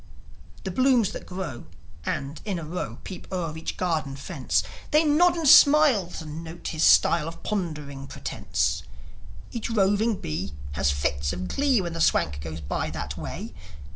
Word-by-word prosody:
The 190 - -3
blooms 255 -1 +3
that - - -8
grow, 180 -10 -6 0.4
and, 140 +3 -3
in 200 -4 -2
a 170 - -5
row, 150 -8 -4
Peep 190 - -8
o'er 170 -4 -2
each 160 - -5
garden 160 -6 -1
fence, 130 - -1 0.3
They 305 +2 +4
nod 335 +4 +4
and 325 -3 0
smile 280 - +7
to 160 - -6
note 160 +2 -7
his 160 0 -1
style 165 -2 +5
Of 165 0 -8
ponderous 150 -9 -4
pretence; - - -1 0.7
Each 235 -1 -4
roving 210 +1 +2
bee 80 - -4 0.2
has 70 0 +1
fits 70 0 0
of 90 0 -4
glee 275 -6 +2
When 170 -2 -4
the 165 - -3
Swank 70 - +2
goes 80 +1 -6
by 70 - -2
that - - -5
way. - - -6
165 Hz, 165 wpm, -26 LUFS, 135-210 Hz, 0.7 s, smile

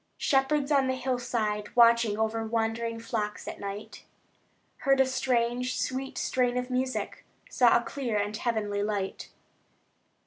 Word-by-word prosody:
Shepherds 275 +1 +1
on 275 -2 +4
the 260 - 0
hillside, 240 -5 -2
watching 235 -3 +5
Over 220 +1 0
wandering 230 +1 -1
flocks 220 -3 -4
at - - -6
night, 205 +2 -7 0.7
Heard 275 -1 +2
a 265 - +6
strange, 250 -1 0
sweet 265 +1 -3
strain 250 -1 0
of 250 +1 -3
music, 255 +1 -2 0.3
Saw 245 -2 +5
a 235 - -2
clear 245 -4 -3
and 205 +1 -1
heavenly 210 -3 -1
light. 205 -2 -3
235 Hz, 135 wpm, -28 LUFS, 220-260 Hz, 0.7 s, a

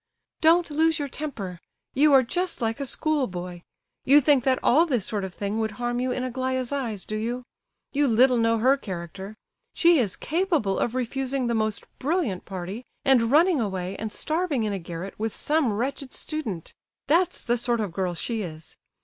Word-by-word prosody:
"Don't 330 0 +4
lose 320 +2 +2
your 290 -2 -2
temper. 225 - -6 0.3
You 295 +3 +4
are 270 -2 +7
just 355 +9 -2
like 225 +1 -1
a 280 - -3
schoolboy. 180 - -2 0.4
You 280 +3 +7
think 285 -2 +4
that 260 -1 +3
all 320 +7 +5
this 245 - 0
sort 205 -3 -2
of 190 - -4
thing 200 +4 -3
would 220 -1 -1
harm 240 0 -1
you 255 0 0
in 255 0 -2
Aglaya's 255 0 -2
eyes, 235 -8 -3
do 215 - -4
you? 235 +4 -3 0.5
You 290 0 +3
little 250 +2 +5
know 230 0 +3
her 260 +5 +4
character. 190 - -7 0.4
She 340 -2 +5
is 210 -7 0
capable 320 - 0
of 240 - -1
refusing 260 +1 -1
the 235 - 0
most 215 -2 -1 0.2
brilliant 280 - -1
party, 190 +5 -6 0.2
and 245 -4 +4
running 315 +1 +4
away 190 -3 -3
and 220 -1 -4
starving 310 -4 -1
in 210 -1 -1
a 195 - -2
garret 170 +3 -6
with 220 0 -1
some 300 -6 +1
wretched 255 +5 -3
student; 230 - -5 0.3
that's 335 +5 +2
the 240 - +1
sort 240 0 0
of 205 -5 -2
girl 180 -1 -1
she 225 +5 -2
is. 160 -4 -8
245 Hz, 185 wpm, -25 LUFS, 210-285 Hz, 0.5 s, are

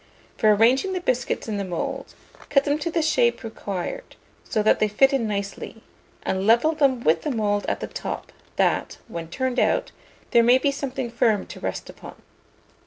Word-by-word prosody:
For 215 - +4
arranging 255 - +3
the 370 - -1
biscuits 255 -9 -1
in 215 -2 -2
the 200 - -2
mould, 180 -3 -4 0.3
cut 275 - +4
them 290 +1 0
to 310 - -2
the 330 -1 0
shape 470 - +2
required, 220 - -5 0.3
so 215 - -1
that 215 - +4
they 215 - +3
fit 270 +7 +3
in 245 -5 +1
nicely, 200 +2 -5 0.4
and 190 +2 -1
level 235 +8 +5
them 275 -6 +1
with 160 - +3
the 305 - -3
mould 210 -5 0
at - - -2
the - - -3
top, - - -6 0.2
that, - - 0
when 170 -7 -6
turned 255 +8 -2
out, - - +1 0.4
there 235 - +6
may 240 +2 +6
be 280 +2 +1
something 265 -3 -4
firm 225 -3 +2
to - - -10
rest - - -4
upon. - - -11
235 Hz, 185 wpm, -24 LUFS, 210-280 Hz, 0.4 s, there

